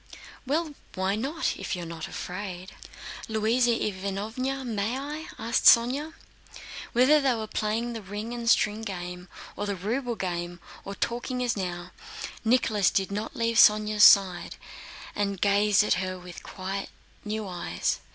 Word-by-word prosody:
"Well, 310 +2 0 0.2
why 190 +1 0
not, 275 +9 -2
if - - -3
you're 175 -1 -5
not 165 -1 -6
afraid?" 185 0 -6 0.6
"Louisa 225 +3 +2
Ivánovna, 220 +6 -2
may 225 +1 -1
I?" 300 +3 -6
asked 230 +3 -1
Sónya. 265 +7 +5 0.8
Whether 265 +5 +5
they 265 -3 +2
were 220 -1 -3
playing 220 +3 -2
the 225 - -6
ring 210 +4 -6
and 235 -1 -2
string 215 -1 +3
game 180 -3 -6 0.3
or 205 - -3
the 200 - -1
ruble 235 +6 -2
game 175 -2 -4 0.3
or 200 - -6
talking 245 +3 -2
as 240 -2 0
now, 180 -2 -4 0.5
Nicholas 220 -5 +3
did 195 0 -1
not 210 +2 -4
leave 230 -1 0
Sónya's 210 -1 +6
side, 185 -3 +6 0.6
and 200 -2 -1
gazed 205 +1 +4
at - - +2
her 185 0 -3
with 180 -1 -10
quite 195 +1 -5 0.4
new 215 0 -3
eyes. 175 -2 -2
210 Hz, 145 wpm, -27 LUFS, 190-235 Hz, 0.8 s, Sónya's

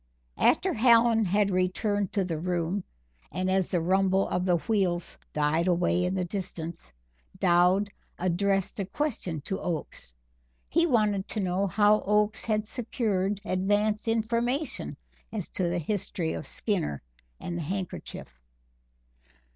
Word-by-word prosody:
After - - +3
Hallen 230 -1 +5
had 200 +2 +2
returned 190 +2 0
to 195 -3 +1
the 165 -3 -3
room, 175 +2 -1 0.5
and 185 +1 -1
as 190 -1 +2
the 180 - 0
rumble 190 +3 +2
of 180 - 0
the 175 - +4
wheels 180 -3 0
died 155 +3 +1
away 175 0 +2
in 180 +1 -1
the 185 -1 0
distance, 170 - -6 0.5
Dowd 180 +4 +3 0.3
addressed 195 +3 0
a 195 - -1
question 200 - -2
to 190 - -4
Oakes. 160 - -4 0.6
He 335 +2 +3
wanted 210 - +2
to 220 - -3
know 190 +1 0
how 210 +3 +4
Oakes 210 +1 +2
had 215 -1 0
secured 210 -4 -1
advance 205 +4 +1
information 235 +6 -1 0.3
as 210 -6 -4
to 180 -2 -1
the 175 - -1
history 175 -1 -2
of - - -4
Skinner 170 - -1 0.4
and 175 - -5
the 170 - -2
handkerchief. 165 - -6
190 Hz, 135 wpm, -28 LUFS, 175-210 Hz, 0.6 s, Hallen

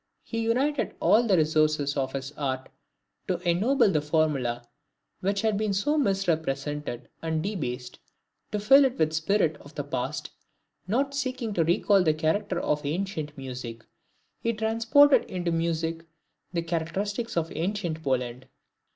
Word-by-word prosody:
He 230 - -4
united 255 +5 0
all 235 +2 +4
the 190 -4 +4
resources 155 -2 +2
of 135 -2 -1
his 135 0 -4
art 130 -3 -3 0.6
to 180 - 0
ennoble 210 +7 +3
the 155 -4 +1
formula 145 -6 0 0.6
which 200 +1 0
had 215 -2 +1
been 215 -2 0
so 205 +11 +1
misrepresented 155 - -1
and 160 -1 -1
debased, 130 -11 -4 0.5
to 210 - -1
fill 270 +7 +7
it 260 -1 -1
with 155 - +3
the 160 - -5
spirit 160 -1 +1
of 145 +2 -15
the 145 - -2
past; 130 -3 -4 0.6
not 270 +7 0
seeking 255 -5 -2
to 170 - +2
recall 190 +4 +3
the 155 -4 +2
character 160 +3 0
of 150 0 0
ancient 155 -1 -3
music, 125 -4 -7 0.5
he 230 - 0
transported 230 +6 +4
into 175 -2 -2
music 165 0 -1 0.5
the 170 -2 -1
characteristics 190 +7 -2
of 165 -1 0
ancient 175 -2 -2
Poland. 125 -3 -2
165 Hz, 145 wpm, -27 LUFS, 150-210 Hz, 0.6 s, fill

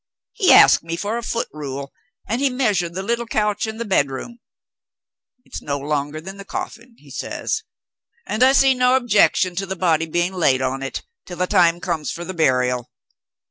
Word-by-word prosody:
He 380 - +3
asked - - +7
me 165 0 -4
for 210 +6 -3
a - - -6
foot 230 0 -2
rule, 140 -2 -6 0.3
and 230 +5 -1
he 280 - +3
measured 205 -10 0
the 190 - -3
little 235 +3 -2
couch 210 -1 0
in 220 0 -6
the 235 - -4
bedroom. 190 - -1 1.1
'It's - - -8
no 140 -1 -3
longer 145 +1 -3
than 190 +5 -9
the 200 - -9
coffin' 235 +4 -7
(he 145 -2 -18
says); - - -3 0.6
'and 215 +3 -3
I 260 +1 +7
see 270 -1 +5
no 250 0 +3
objection 210 -7 +3
to 195 +1 -2
the 190 - -4
body 165 -3 +1
being 175 +3 -1
laid 145 -8 +2
on 130 +1 -2
it, 135 - -5 0.2
till 175 - -8
the 180 - +1
time 175 -3 +3
comes 170 -5 -3
for 175 - -6
the 185 - -5
burial.' 125 -6 +1
180 Hz, 190 wpm, -21 LUFS, 150-225 Hz, 1.1 s, asked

